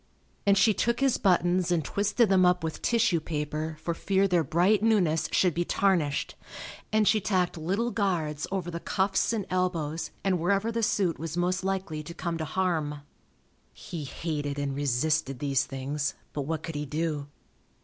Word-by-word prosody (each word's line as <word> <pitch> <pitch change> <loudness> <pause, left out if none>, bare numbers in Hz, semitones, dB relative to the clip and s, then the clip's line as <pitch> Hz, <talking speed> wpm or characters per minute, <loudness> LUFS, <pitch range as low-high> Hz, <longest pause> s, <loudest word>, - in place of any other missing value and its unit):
And 200 0 +5
she 210 +2 +5
took 235 +3 0
his 270 -2 +2
buttons 180 -1 +2
and 165 -4 +1
twisted 210 - +2
them 190 -1 +4
up 180 -1 +3
with 160 -1 -4
tissue 230 -7 +2
paper 155 0 -3
for 170 - -1
fear 195 +3 +1
their 175 -3 +2
bright 180 +8 +3
newness 190 -8 +2
should 180 -3 +3
be 175 - 0
tarnished, 170 -7 +1 0.6
and 215 -1 +3
she 215 - +4
tacked 185 -3 0
little 195 +9 -1
guards 170 -8 -1
over 185 -3 -2
the 170 - -4
cuffs 195 +4 +1
and 215 -4 -2
elbows 170 -4 -1
and 190 -2 +1
wherever 200 +6 +1
the 230 0 -1
suit 190 -6 +1
was 165 +1 -5
most 180 +1 0
likely 190 -5 -2
to 170 +3 -9
come 170 -2 -3
to 160 - -2
harm. 155 -4 -1 0.7
He 165 -4 -7
hated 145 -1 -3
and 140 -1 -2
resisted 145 +1 0
these 140 -1 +1
things, 140 +2 -3 0.2
but 140 -2 -3
what 160 -1 -2
could 165 - -5
he 150 0 -4
do? 150 -1 -2
175 Hz, 175 wpm, -28 LUFS, 155-195 Hz, 0.7 s, And